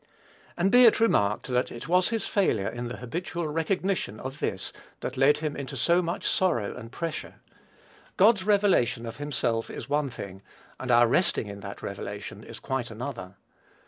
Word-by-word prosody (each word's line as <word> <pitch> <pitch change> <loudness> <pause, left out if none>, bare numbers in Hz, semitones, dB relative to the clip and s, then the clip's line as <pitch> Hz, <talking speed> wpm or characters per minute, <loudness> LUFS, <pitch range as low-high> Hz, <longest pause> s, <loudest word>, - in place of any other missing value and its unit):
And, 185 +3 +2
be 250 0 +8
it 225 - +6
remarked, 105 - +2
that 125 0 +1
it 120 - -8
was 180 +2 +3
his 225 -3 -1
failure 115 - +1
in 120 +1 -4
the 120 - -6
habitual 170 +6 -4
recognition 165 - -1
of 135 +2 -6
this 95 0 -3 0.3
that - - -4
led 135 +3 +4
him 150 -1 -3
into 140 -2 -5
so 175 +1 +3
much 170 0 -2
sorrow 120 - +1
and 115 +1 -9
pressure. 165 +2 -5 0.8
God's 205 0 +5
revelation 195 - +3
of 115 0 -7
himself 120 -6 -1
is - - -7
one 145 -1 +1
thing, 100 -5 -8 0.4
and 130 - -5
our 120 0 +6
resting 135 0 +2
in 100 -1 -8
that 100 0 -8
revelation 100 +1 -6
is - - -10
quite 130 -3 -3
another. 115 -5 -6
135 Hz, 175 wpm, -27 LUFS, 115-175 Hz, 0.8 s, be